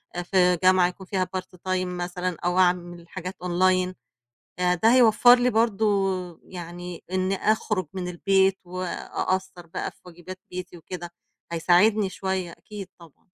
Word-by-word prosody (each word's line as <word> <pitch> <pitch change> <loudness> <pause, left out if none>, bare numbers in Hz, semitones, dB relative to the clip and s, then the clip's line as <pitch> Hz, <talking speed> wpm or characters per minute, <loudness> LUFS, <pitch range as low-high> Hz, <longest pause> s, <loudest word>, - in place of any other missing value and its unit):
أ 175 - -2
في 180 -1 +3
جامعة 185 -1 +5
يكون 190 +2 -8
فيها 185 -2 -1
part 185 - -4 0.2
time 185 0 +1
مثلًا 180 0 -3
أو 180 +1 +2
اعمل 175 -1 +1
حاجات 185 0 -6
online 185 +1 +2 0.7
آآ 180 0 +3
ده 225 +7 +4
هيوفّر 245 0 +7
لي 250 +1 +3
برضه، 220 -2 +2 0.6
يعني 175 0 -8
إنّي 185 +1 0
أخرُج 210 -3 0
من 185 -1 -4
البيت 190 +2 +2
وأقصّر 185 0 -3
بقى 165 - -4
في - - -29
واجِبات 180 +1 -10
بيتي 180 -1 -7
وكده 175 +1 -8 0.4
هيساعدني 190 +5 +3
شوية 190 -2 -3
أكيد 200 +1 -9
طبعًا. 165 -4 -17
185 Hz, 145 wpm, -25 LUFS, 175-190 Hz, 0.7 s, هيوفّر